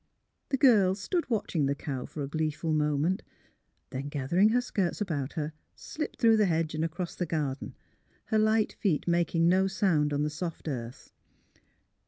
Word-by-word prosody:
The 270 - +1
girl 210 -9 +5
stood 325 - -2
watching 175 - 0
the 140 - 0
cow 135 -3 -5
for 150 - -5
a - - -3
gleeful 155 +1 -1
moment; 150 +4 +1 0.7
then, 135 +2 -4
gathering 155 +9 +2
her 240 +3 +3
skirts 195 -8 -1
about 150 -9 -2
her, 155 -2 -3 0.2
slipped 305 - -6
through 225 -2 +5
the 210 -2 +4
hedge 160 -2 0
and 155 0 -1
across 170 +2 -3
"the 180 - -3
garden, 145 -4 -3 0.5
her 220 - +1
light 215 0 +2
feet 180 -8 0
making 170 -1 +2
no 190 +2 +4
sound 185 -6 +1
on 145 0 0
the 150 - -1
soft 165 +1 -5
earth. 120 -4 -6
165 Hz, 170 wpm, -29 LUFS, 150-195 Hz, 0.7 s, girl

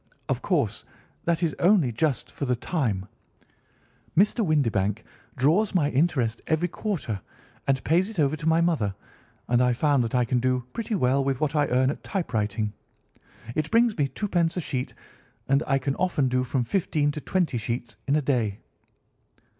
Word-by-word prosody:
Of - - -1
course, - - 0 0.4
that 170 +1 +1
is 160 - +1
only 175 - +4
just 130 +2 -1
for 140 - -4
the 125 -1 +1
time. 115 - -1 1.1
Mr. 210 +4 +4
Windibank 115 - +1 0.3
draws 170 - +2
my 150 -5 +2
interest 130 -6 +1
every 160 +2 +1
quarter 160 - -3 0.5
and 135 -1 +1
pays 180 +6 +2
it 220 - -9
over 150 -1 +2
to 155 +1 -5
mother, 160 - +2 0.5
and 120 0 +3
I 125 -1 +3
find 140 +1 +2
that 115 +1 -2
I 125 -1 +3
can 125 +1 +1
do 125 0 +1
pretty 230 -1 -2
well 135 -4 +2
with 135 -1 -1
what 155 0 0
I 145 -1 +3
earn 130 +2 +2
at - - -8
typewriting. 110 - -2 0.8
It 155 +2 -1
brings 230 -1 +3
me 145 -3 +1
twopence 175 0 -1
a - - 0
sheet, 130 -5 -4 0.5
and 140 +1 +3
I 135 -2 +3
can 135 +1 -2
often 150 -8 +1
do 125 0 +1
from 130 0 0
fifteen 150 - 0
to 150 - -6
twenty 170 -10 0
sheets 120 +2 -4
in 140 - +3
a 150 - +1
day." 115 -7 0
140 Hz, 170 wpm, -26 LUFS, 125-165 Hz, 1.1 s, only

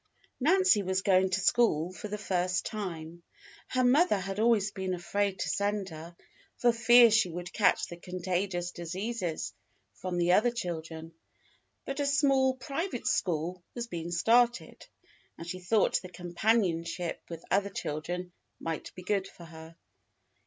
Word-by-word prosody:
Nancy 355 - +4
was 190 0 -1
going 190 -1 +4
to 190 +1 0
school 185 -5 +2
for 185 - -7
the 210 0 -4
first 180 -3 -1
time. 170 -5 -6 0.5
Her 255 0 0
mother 275 - +4
had 195 +1 -4
always 220 -3 +3
been 190 -1 -3
afraid 195 +2 -1
to - - -2
send 200 +2 -1
her 165 +1 -10 0.4
for 240 -1 +3
fear 235 0 +7
she 220 -4 +3
would 175 +1 -7
catch 210 - +3
the 175 - -9
contagious 180 0 -3
diseases 180 +1 -4 0.4
from 180 -1 -4
the 175 0 +2
other 215 +6 +5
children, 165 -7 -5 0.7
but 275 +1 -4
a 285 - +1
small 270 -2 +3
private 275 +2 -4
school 175 +1 -1
was 240 -1 -3
being 170 -6 -5
started, 235 +8 +2 0.5
and 165 - -8
she 185 +2 -5
thought 200 +4 +2
the 185 - -9
companionship 175 -2 -1
with 165 -1 -8
other 200 +1 +2
children 180 +1 -4 0.3
might 165 -1 -4
be 180 - -9
good 195 0 0
for 170 - -13
her. 160 0 -12
185 Hz, 150 wpm, -30 LUFS, 175-225 Hz, 0.7 s, fear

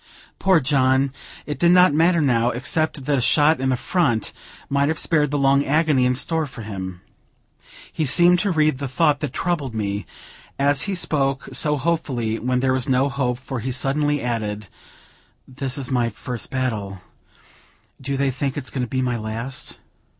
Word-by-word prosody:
Poor 190 -3 +4
John! 135 -1 +2 0.3
it 150 - -5
did 170 0 +4
not 180 -3 +6
matter 165 +2 +3
now, 120 -4 +2
except 140 +3 -2
that 145 -1 +1
a - - 0
shot 150 +5 +4
in 135 - +1
the 130 - +1
front 125 - 0 0.3
might 140 0 +1
have 160 +1 -1
spared 150 -3 +2
the 145 - -1
long 140 0 +3
agony 150 -3 +2
in 125 - +1
store 160 +3 -1
for 125 -4 -10
him. 95 -4 -6 0.9
He 160 - -1
seemed 175 +5 +5
to 205 - 0
read 155 -5 +2
the 140 - -3
thought 145 +2 +2
that 150 -4 -3
troubled 150 -6 -2
me, 100 -1 -3 0.5
as 140 0 +2
he 195 - -1
spoke 135 -5 0
so 150 -1 +1
hopefully 130 -8 -1
when 125 +1 0
there 130 0 +2
was 130 -1 -1
no 130 +2 +2
hope, 125 -2 -1
for 130 0 -6
he 130 +4 -3
suddenly 145 +2 0
added: 105 -4 -3 0.8
"This 130 0 -4
is 135 -1 -5
my 120 -2 +1
first 120 +2 -6
battle; 105 -8 -3 1.0
do 140 +1 -3
they 140 0 +1
think 135 +2 -3
it's 130 -5 -4
going 130 - -3
to - - -3
be 130 0 -1
my 120 -2 -1
last?" 115 +5 -5
135 Hz, 180 wpm, -22 LUFS, 125-150 Hz, 1.0 s, not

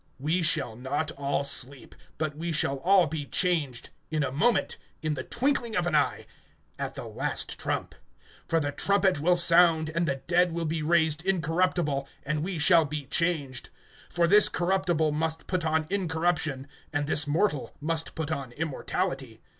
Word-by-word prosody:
We 155 +7 0
shall 155 -8 +1
not 145 +6 -3
all 140 -1 -2
sleep, 140 -1 +1 0.2
but 155 -1 -3
we 170 +2 -4
shall 140 -3 +1
all 185 +5 +4
be 150 -2 -5
changed, 160 -9 -1 0.2
(52)in 155 -3 0
a - - -6
moment, 225 - +1 0.3
in 155 -1 0
the 135 - -4
twinkling 240 - 0
of 180 - +1
an 175 - -1
eye, 150 - +1 0.5
at - - -4
the - - -7
last - - -3
trump; - - -3 0.5
for 165 - +2
the 145 -2 -2
trumpet 195 +1 +1
will 175 +4 +3
sound, 170 -2 +5
and 170 +1 0
the 140 - 0
dead 175 +5 +1
will 170 0 -2
be 160 0 -2
raised 160 -1 +2
incorruptible, 165 -5 0 0.2
and 150 +1 -1
we 180 +2 -3
shall 165 +2 +5
be 150 -1 -5
changed. 145 -4 -2 0.4
(53)For 170 0 +2
this 210 +4 +7
corruptible 175 -3 0
must 160 +2 -2
put 180 -2 -2
on 160 0 0
incorruption, 160 -7 -1 0.2
and 145 0 -1
this 150 0 +2
mortal 145 - 0
must 160 +1 -2
put 160 -1 -4
on 135 -5 -4
immortality. 150 0 -3
160 Hz, 170 wpm, -27 LUFS, 145-175 Hz, 0.5 s, this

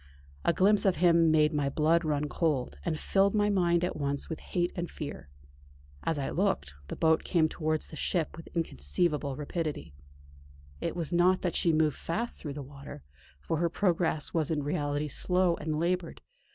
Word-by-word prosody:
A - - +3
glimpse 200 +5 +4
of 190 -3 +3
him 170 -1 +4
made 155 0 +4
my 145 -2 0
blood 160 +4 +2
run 150 -1 0
cold, 145 -4 -1
and 155 -3 -2
filled 195 +1 +2
my 210 0 +3
mind 175 -3 +2
at 180 - -1
once 140 -1 -2
with 160 - -4
hate 175 0 -1
and 175 -1 -3
fear. 145 - -7 0.7
As 165 - -1
I 140 - -2
looked, 70 +1 0
the - - -5
boat 160 -1 +3
came 165 -3 +2
towards 155 -1 -2
the - - -9
ship 160 +1 -1
with 165 - -11
inconceivable 145 - 0
rapidity. 150 - -4 0.9
It - - -3
was 170 -1 -3
not 180 +2 +4
that 180 - -1
she 170 - +3
moved 155 -2 +2
fast 230 +8 -3
through 145 -3 -5
the 145 0 -6
water, 140 - -11 0.4
for 160 - -2
her 170 +1 +1
progress 170 -4 0
was 160 -3 0
in 150 -3 -1
reality 145 0 -1
slow 180 +4 +2
and 155 0 -2
laboured. 175 0 -1
160 Hz, 180 wpm, -29 LUFS, 145-175 Hz, 0.9 s, glimpse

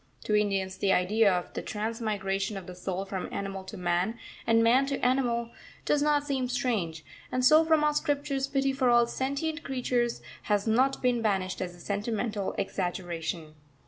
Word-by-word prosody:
To 210 - +1
Indians 195 -2 0
the 195 0 +1
idea 200 +3 +4
of 180 -1 -2
the - - -3
transmigration 210 -2 -2
of 190 - -7
the 180 - -8
soul 185 +1 -4
from 190 -1 -5
animal 195 -1 -4
to - - -8
man, 180 +5 0 0.3
and 230 0 +5
man 255 +4 +4
to 275 -1 -1
animal, 240 -2 +1 0.3
does 295 - +2
not 295 -1 +2
seem 265 -3 -1
strange, 205 -11 -1 0.3
and 255 0 +1
so 310 +4 +7
from 320 -1 +3
our 300 0 +3
scriptures 285 -2 0
pity 275 -1 +1
for 265 -2 +2
all 240 0 +6
sentient 280 +6 -2
creatures 250 -4 -1 0.2
has 205 -1 +1
not 260 +5 +2
been 245 -2 +2
banished 190 -4 0
as 180 -1 -4
a - - -16
sentimental 210 +1 -2
exaggeration. 175 -4 -3
225 Hz, 175 wpm, -28 LUFS, 190-260 Hz, 0.3 s, so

